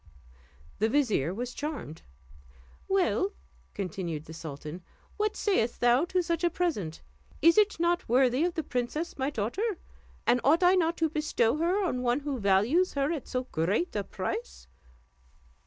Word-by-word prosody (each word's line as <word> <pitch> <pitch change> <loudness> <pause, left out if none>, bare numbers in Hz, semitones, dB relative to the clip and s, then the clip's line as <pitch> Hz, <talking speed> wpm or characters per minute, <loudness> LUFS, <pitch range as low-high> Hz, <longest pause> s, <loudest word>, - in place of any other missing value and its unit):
The 220 +2 +2
vizier 220 - +1
was 240 +5 -4
charmed. 290 - -5 0.9
"Well," 385 +1 +1 0.4
continued 175 -5 -4
the 160 - -10
sultan, 155 +1 -7 0.4
"what 425 0 0
sayest 310 - 0
thou 245 +5 +4
to 365 0 0
such 335 0 -1
a 345 - +4
present? 300 - -2 0.4
Is 335 0 +6
it 420 -4 +3
not 345 -2 +1
worthy 255 +3 +3
of 350 0 0
the 320 - -1
princess 270 +7 -3
my 265 +1 +1
daughter? 315 - -2 0.5
And 245 +1 +3
ought 320 +6 +4
I 355 +1 +6
not 340 -2 +2
to 325 -1 +1
bestow 300 -5 +1
her 360 +5 +1
on 250 -8 -1
one 250 +3 +1
who 280 -3 -3
values 215 - +3
her 280 +2 +1
at 315 -6 -4
so 255 -1 -2
great 195 - 0
a 205 - 0
price?" 190 - -5
275 Hz, 155 wpm, -29 LUFS, 215-340 Hz, 0.9 s, Is